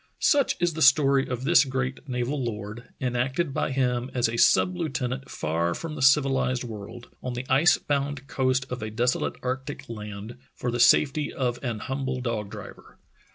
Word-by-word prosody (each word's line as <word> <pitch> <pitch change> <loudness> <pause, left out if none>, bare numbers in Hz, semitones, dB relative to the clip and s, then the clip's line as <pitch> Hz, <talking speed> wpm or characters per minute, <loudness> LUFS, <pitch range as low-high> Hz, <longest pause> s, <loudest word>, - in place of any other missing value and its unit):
Such 285 -3 +3
is 175 -1 +1
the 160 - -5
story 135 -1 +5
of 125 0 -4
this 165 +4 +5
great 130 +1 -4
naval 125 +3 -2
lord, 110 +1 -6
enacted 130 +5 -1
by - - -1
him 125 -2 0
as 120 -2 +2
a 115 - -3
sub 180 +9 +4
lieutenant 135 -5 -3
far 85 +2 -1
from 165 -2 -5
the 150 - -6
civilized 135 -2 +3
world, 115 +1 -8
on 125 - -4
the 125 +1 -5
ice 140 +7 +5
bound 140 -1 -2
coast 130 0 0
of 125 - -4
a 110 - -4
desolate 120 +3 0
arctic 130 +2 -4
land, 105 +1 -8 0.2
for 120 - -3
the 120 - -2
safety 145 +4 +4
of 125 -2 -2
an 120 -4 -2
humble 130 -1 -3
dog 115 -5 -3
driver. - - -11
130 Hz, 175 wpm, -26 LUFS, 120-135 Hz, 0.2 s, story